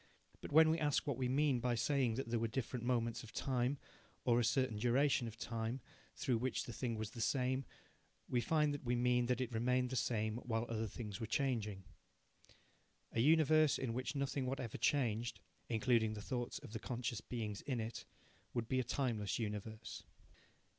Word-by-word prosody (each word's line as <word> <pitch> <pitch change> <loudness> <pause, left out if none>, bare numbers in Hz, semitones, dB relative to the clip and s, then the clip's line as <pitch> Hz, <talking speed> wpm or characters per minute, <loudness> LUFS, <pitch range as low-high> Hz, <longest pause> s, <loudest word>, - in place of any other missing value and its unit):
But - - -7
when 160 +1 +7
we 165 - +1
ask 150 -3 +1
what 140 - 0
we 125 -1 +1
mean 140 -1 +3
by 120 0 +1
saying 130 -1 +2
that 135 +1 -3
there 115 0 0
were 115 - +1
different 125 0 -3
moments 120 -1 0
of 115 -3 -11
time, 130 +1 0 0.5
or 120 -1 +4
a - - +3
certain 125 -1 +2
duration 125 +2 +3
of 115 0 -8
time, 115 +2 -3 0.4
through 120 -4 +1
which 130 +2 -1
the 120 - -7
thing 120 -2 -2
was 110 -1 -4
the 120 - -6
same, 130 +2 +1 0.6
we 120 - +1
find 150 +3 +2
that 145 - -5
we 125 -1 +1
mean 125 0 +3
that 125 +1 +1
it 125 -2 -2
remained 125 +2 +1
the - - -1
same 110 -3 0
while 115 -2 -1
other 110 -1 -1
things 105 -4 -6
were 115 - -3
changing. 110 -7 -1 1.3
A - - -1
universe 155 +2 +5
in 125 -4 -2
which 130 +4 -2
nothing 140 -1 -1
whatever 125 -4 -3
changed 120 -4 +1 0.3
(including 115 -1 +2
the 105 - -6
thoughts 120 0 -3
of 130 -7 -10
the 115 - -3
conscious 120 -1 -3
beings 110 -4 -4
in 130 -4 -2
it) 110 +1 -4 0.5
would 115 -2 -1
be 130 +1 +1
a - - +2
timeless 115 -5 -1
universe. 110 0 -4
120 Hz, 190 wpm, -38 LUFS, 115-130 Hz, 1.3 s, when